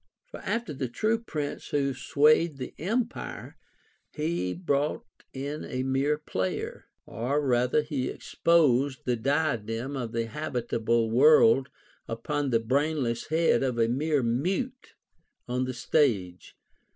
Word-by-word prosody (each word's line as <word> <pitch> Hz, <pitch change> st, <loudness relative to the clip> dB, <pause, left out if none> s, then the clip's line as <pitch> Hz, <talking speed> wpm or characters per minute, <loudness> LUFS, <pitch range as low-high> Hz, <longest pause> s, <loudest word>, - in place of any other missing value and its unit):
For -, -, -8 dB
after 230 Hz, -7 st, -2 dB
the 130 Hz, -1 st, -3 dB
true 215 Hz, -, 0 dB
prince 150 Hz, -10 st, -4 dB
who 140 Hz, -2 st, 0 dB
swayed 150 Hz, +4 st, +3 dB
the 130 Hz, -2 st, -6 dB
empire, 230 Hz, -, -3 dB, 0.5 s
he 155 Hz, -, -2 dB
brought 150 Hz, -4 st, -1 dB, 0.3 s
in 140 Hz, +3 st, -5 dB
a 130 Hz, 0 st, -3 dB
mere 135 Hz, +3 st, +1 dB
player; 95 Hz, -10 st, -4 dB, 0.2 s
or 125 Hz, +6 st, -1 dB
rather 125 Hz, +3 st, +2 dB
he 145 Hz, -4 st, -2 dB
exposed 140 Hz, -5 st, +2 dB
the 125 Hz, -, +1 dB
diadem 130 Hz, -1 st, -1 dB
of 120 Hz, -4 st, -4 dB
the 115 Hz, -1 st, -1 dB
habitable 115 Hz, -3 st, -1 dB
world 135 Hz, -1 st, +6 dB, 0.4 s
upon 140 Hz, +5 st, -2 dB
the 115 Hz, -2 st, +3 dB
brainless 130 Hz, 0 st, 0 dB
head 160 Hz, +1 st, +2 dB
of 130 Hz, -3 st, -1 dB
a 115 Hz, -1 st, +3 dB
mere 145 Hz, +3 st, +1 dB
mute 185 Hz, -, -2 dB, 0.5 s
on 125 Hz, +1 st, -1 dB
the 130 Hz, -, -4 dB
stage. 115 Hz, -, 0 dB
135 Hz, 125 wpm, -27 LUFS, 120-150 Hz, 0.5 s, world